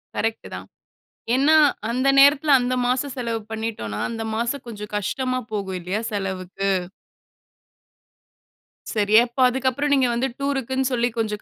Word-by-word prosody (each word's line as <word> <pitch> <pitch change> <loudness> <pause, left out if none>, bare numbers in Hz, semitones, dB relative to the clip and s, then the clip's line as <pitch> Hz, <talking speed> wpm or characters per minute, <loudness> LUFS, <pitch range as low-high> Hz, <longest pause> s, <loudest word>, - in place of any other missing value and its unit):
Correct 225 0 -2
தான். - - -9 0.7
ஏன்னா 285 +4 +4 0.3
அந்த 255 +3 0
நேரத்துல 285 +2 +5
அந்த 245 +1 -1
மாசம் 255 +2 -1
செலவு 230 -2 -2
பண்ணிட்டோம்னா, 220 - -4 0.3
மாசம் 240 +4 -2
கொஞ்சம் 210 -2 -8
கஷ்டமா 255 +5 -2
போகும் 195 -3 -3
இல்லயா 185 +5 -3
செலவுக்கு. 195 -1 -3 2.2
சரி 210 -2 0
அப்ப 240 +2 -11
அதுக்கப்புறம் 265 +3 -1
நீங்க 265 -2 +3
வந்து 240 +3 0
டூர்க்குன்னு 265 -2 -1
சொல்லி 240 0 +1
கொஞ்சம் 210 -2 -2
235 Hz, 120 wpm, -22 LUFS, 210-265 Hz, 2.2 s, நேரத்துல